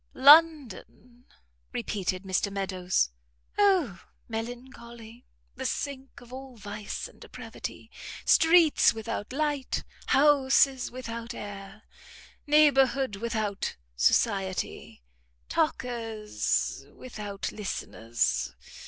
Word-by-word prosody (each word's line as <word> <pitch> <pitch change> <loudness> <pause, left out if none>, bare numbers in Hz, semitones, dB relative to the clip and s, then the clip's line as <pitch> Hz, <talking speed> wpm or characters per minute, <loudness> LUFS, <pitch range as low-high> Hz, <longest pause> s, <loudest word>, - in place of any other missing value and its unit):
"London!" 265 - +4 0.5
repeated 185 - -2
Mr 190 +1 -1
Meadows, 185 - 0 0.5
"O 365 - +3 0.3
melancholy! 235 0 -8 0.3
the - - -6
sink 270 -3 -5
of 245 +1 -14
all 260 -2 -9
vice 205 0 -6
and - - -20
depravity. - - -9 0.3
Streets 325 -6 +5
without 220 -1 -5
light! 290 -1 -1 0.2
Houses 270 -2 +4
without 235 -1 -7
air! 205 +1 -9 0.6
Neighbourhood 270 -6 +4
without 215 -2 -2 0.2
society! 190 - 0 0.5
Talkers 235 -9 -1
without 210 -5 -6
listeners! 115 - -2
235 Hz, 80 wpm, -28 LUFS, 200-270 Hz, 0.6 s, Streets